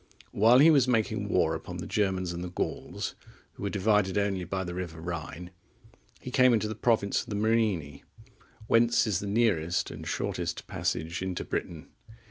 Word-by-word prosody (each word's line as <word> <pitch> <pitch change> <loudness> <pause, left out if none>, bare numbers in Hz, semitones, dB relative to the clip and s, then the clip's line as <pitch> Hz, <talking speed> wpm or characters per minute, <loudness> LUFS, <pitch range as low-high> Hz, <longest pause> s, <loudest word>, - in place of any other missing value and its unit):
While 115 +4 +5
he 155 +5 +7
was 140 -5 +4
making 115 -4 0
war 80 - +2
upon 85 +2 -6
the 85 - -6
Germans 95 -4 -1
and 85 +1 -5
the 90 - -5
Gauls, 90 - -4 0.4
who - - -14
were 100 - -1
divided 100 -1 +1
only 100 -2 0
by 95 +2 -3
the 90 -1 -5
river 90 -3 -5
Rhine, 85 +1 -6 0.7
he 125 - -8
came 130 -1 +5
into 110 -2 +1
the 110 - -3
province 110 -2 +1
of - - -11
the 105 - -3
Morini, 105 -10 0 0.6
whence 120 +1 +3
is 105 -5 0
the 100 - -5
nearest 100 -6 +1
and - - -8
shortest - - -3
passage 80 +3 -3
into 95 -1 -3
Britain. 80 -3 -5
100 Hz, 175 wpm, -28 LUFS, 90-110 Hz, 0.7 s, he